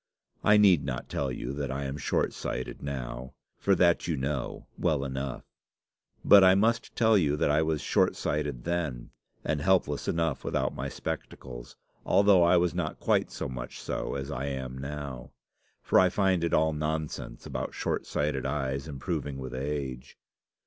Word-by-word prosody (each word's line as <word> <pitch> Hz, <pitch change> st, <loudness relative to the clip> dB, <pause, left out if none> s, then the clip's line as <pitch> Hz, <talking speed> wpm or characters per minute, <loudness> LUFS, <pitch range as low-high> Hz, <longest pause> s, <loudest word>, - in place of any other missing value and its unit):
I 105 Hz, 0 st, +6 dB
need 95 Hz, -8 st, +6 dB
not 65 Hz, -2 st, -4 dB
tell 70 Hz, -2 st, -1 dB
you -, -, -4 dB
that 70 Hz, -1 st, -3 dB
I 70 Hz, +1 st, -3 dB
am 70 Hz, 0 st, -3 dB
short 75 Hz, -, 0 dB
sighted 65 Hz, -, -5 dB
now, 65 Hz, -2 st, -5 dB, 0.2 s
for 100 Hz, -, +3 dB
that 85 Hz, -1 st, +3 dB
you 80 Hz, -3 st, 0 dB
know 70 Hz, 0 st, -3 dB
well 75 Hz, -5 st, 0 dB
enough. 65 Hz, 0 st, -4 dB, 0.8 s
But 100 Hz, -1 st, +9 dB
I 95 Hz, 0 st, +7 dB
must 115 Hz, +4 st, +1 dB
tell 110 Hz, -2 st, +4 dB
you 75 Hz, -3 st, +1 dB
that 75 Hz, -, +2 dB
I 75 Hz, +2 st, +3 dB
was 80 Hz, -2 st, 0 dB
short -, -, +2 dB
sighted 75 Hz, -5 st, -2 dB
then, 80 Hz, -8 st, -2 dB, 0.3 s
and 75 Hz, -1 st, -1 dB
helpless 85 Hz, -5 st, +2 dB
enough 80 Hz, -4 st, 0 dB
without -, -, -1 dB
my -, -, -4 dB
spectacles, -, -, -6 dB, 0.3 s
although 100 Hz, -2 st, +5 dB
I 85 Hz, +1 st, +5 dB
was 85 Hz, 0 st, +2 dB
not 85 Hz, -3 st, -3 dB
quite -, -, +2 dB
so -, -, -4 dB
much 60 Hz, -2 st, -7 dB
so -, -, -3 dB
as 70 Hz, 0 st, -4 dB
I 70 Hz, +2 st, -3 dB
am 65 Hz, -2 st, -4 dB
now; 70 Hz, -1 st, -6 dB, 0.5 s
for -, -, +4 dB
I 95 Hz, -1 st, +5 dB
find 95 Hz, -2 st, +1 dB
it 85 Hz, -, 0 dB
all 80 Hz, 0 st, +3 dB
nonsense 75 Hz, 0 st, -3 dB
about -, -, -4 dB
short -, -, -2 dB
sighted 75 Hz, -3 st, -1 dB
eyes 70 Hz, 0 st, -2 dB
improving 70 Hz, 0 st, -4 dB
with 65 Hz, -2 st, -6 dB
age. 65 Hz, -1 st, -4 dB
75 Hz, 170 wpm, -29 LUFS, 65-85 Hz, 0.8 s, But